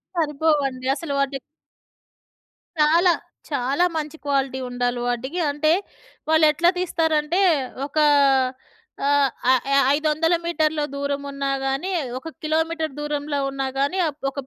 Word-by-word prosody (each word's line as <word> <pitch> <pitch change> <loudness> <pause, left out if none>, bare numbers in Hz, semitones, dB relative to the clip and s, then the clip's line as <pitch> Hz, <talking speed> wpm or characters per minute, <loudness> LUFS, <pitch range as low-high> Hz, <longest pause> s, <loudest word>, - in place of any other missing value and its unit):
సరిపోవండి. 295 -5 0
అసలు 295 0 -5
వాటి 275 0 0 1.4
చాలా. 330 +4 +5 0.4
చాలా 280 +4 +1
మంచి 310 0 -4
క్వాలిటీ 270 -2 0
ఉండాలి 245 0 -1
వాటికి. 260 +8 -2
అంటే 300 +2 +1 0.6
వాళ్ళు 315 0 +5
ఎట్లా 340 +3 +3
తీస్తారంటే, 325 -1 +1 0.5
ఒకా 305 +2 +1 1.0
ఆహ్, 285 -1 +3 0.2
ఆహ్, 260 -2 +3
య 275 - +4 0.2
500 310 +2 +1
మీటర్ల 315 -2 0
దూరం 280 0 -2
ఉన్నా 275 0 -3
గానీ, 270 +8 -1 0.3
ఒక 265 - -8 0.2
కిలోమీటర్ 320 0 -1
దూరంలో 295 -1 -2
ఉన్నా 270 0 -3
గానీ, 285 +7 0 0.3
ఒక 275 - -15
295 Hz, 115 wpm, -22 LUFS, 275-320 Hz, 1.4 s, చాలా